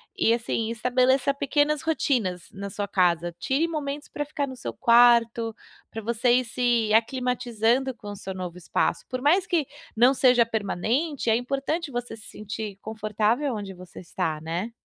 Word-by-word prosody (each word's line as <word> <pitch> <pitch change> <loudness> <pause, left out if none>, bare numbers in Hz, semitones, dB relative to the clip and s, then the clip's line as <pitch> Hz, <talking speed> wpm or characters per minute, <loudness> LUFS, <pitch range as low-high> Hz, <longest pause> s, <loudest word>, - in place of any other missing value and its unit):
e - - +2
assim 230 -1 -1
estabeleça 255 +4 +2
pequenas 290 +2 +1
rotinas 245 - -1
na 200 +1 -6
sua 200 +1 -4
casa. 175 -3 +1
Tire 270 - +1
momentos 295 -2 -4
para 295 - -3
ficar 290 -1 -2
no 260 - -7
seu 245 - -5
quarto 235 -1 +4 0.3
pra 225 - -6
você 235 +2 +2
ir 255 +1 +3
se 240 -2 +1
aclimatizando 245 +1 +1
com 205 -3 -9
o - - -7
seu 190 -1 -6
novo 180 -2 -6
espaço. 175 - -1
Por 255 0 -4
mais 350 +6 +3
que 330 -5 +1 0.3
não 245 +4 +6
seja 250 -3 +4
permanente, 230 - -1
é - - +4
importante 275 +6 -2
você 245 -1 -4
se 220 - -13
sentir 210 -1 -6
confortável 220 +5 -1
onde 200 -2 -6
você 180 -1 -12
está, 160 -3 -3
né? 170 +8 -3
235 Hz, 165 wpm, -25 LUFS, 210-270 Hz, 0.3 s, não